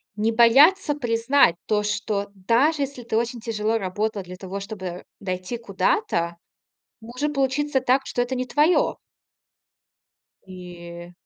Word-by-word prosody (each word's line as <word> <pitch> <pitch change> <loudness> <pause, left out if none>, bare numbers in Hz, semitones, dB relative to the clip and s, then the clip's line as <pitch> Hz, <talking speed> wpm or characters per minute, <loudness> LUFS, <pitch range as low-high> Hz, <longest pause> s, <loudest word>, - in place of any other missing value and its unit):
не 215 +2 +1
бояться 285 +9 +5
признать 235 - +3
то, 210 -1 +1
что, 210 -1 -2
даже 250 - +2
если 270 -2 -6
ты 225 -1 -1
очень 235 +1 -2
тяжело 220 0 -1
работал 205 +1 -2
для 180 +1 -9
того, 190 +1 -6
чтобы 190 -4 -7 0.2
дойти 185 +4 -4
куда-то, 185 -5 -1 0.6
может 255 +7 -3
получиться 275 0 0
так, 260 +1 +2
что 245 - -1
это 250 +2 -2
не 255 0 -2
твое. 300 +7 +2 1.5
И 175 -1 -10
225 Hz, 130 wpm, -23 LUFS, 190-260 Hz, 1.5 s, бояться